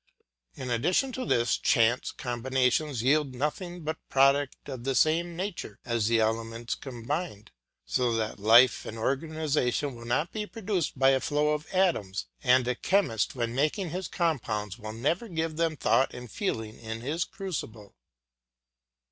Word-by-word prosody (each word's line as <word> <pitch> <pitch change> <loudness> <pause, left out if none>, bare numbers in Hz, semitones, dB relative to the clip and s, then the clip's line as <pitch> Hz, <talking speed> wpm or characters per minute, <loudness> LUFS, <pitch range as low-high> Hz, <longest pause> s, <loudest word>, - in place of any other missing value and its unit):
In 125 - -5
addition 175 - +2
to 255 0 -4
this, 120 -1 +2
chance 120 -2 +2
combinations 125 +1 0
yield 140 0 +2
nothing 175 +6 -3
but 160 +1 -3
products 135 +1 +3
of 130 -4 -7
the 135 0 -1
same 165 +5 +2
nature 175 - -5
as 115 -3 0
the 115 0 +3
elements 115 +1 -1
combined, 125 - -5 0.3
so 125 -2 +1
that 110 -2 -2
life 115 +5 +6
and 110 - -7
organisation 145 +1 0
will 115 -1 -10
not 130 +8 0
be 210 -1 -4
produced 200 - -2
by 135 +1 +5
a 135 - +3
flow 150 +3 +1
of 150 0 -1
atoms, 135 - +1 0.2
and 125 - +4
a 125 - +2
chemist 125 - +1
when 120 -2 -2
making 155 - 0
his 185 +2 -3
compounds 110 - -2
will 110 -1 -6
never 155 - -1
give 165 -4 -2
them 165 -2 0
thought 135 - +2
and 125 -2 -9
feeling 110 - -3
in 110 0 -6
his 155 +8 -1
crucible. 115 - -6
135 Hz, 155 wpm, -28 LUFS, 115-160 Hz, 0.3 s, life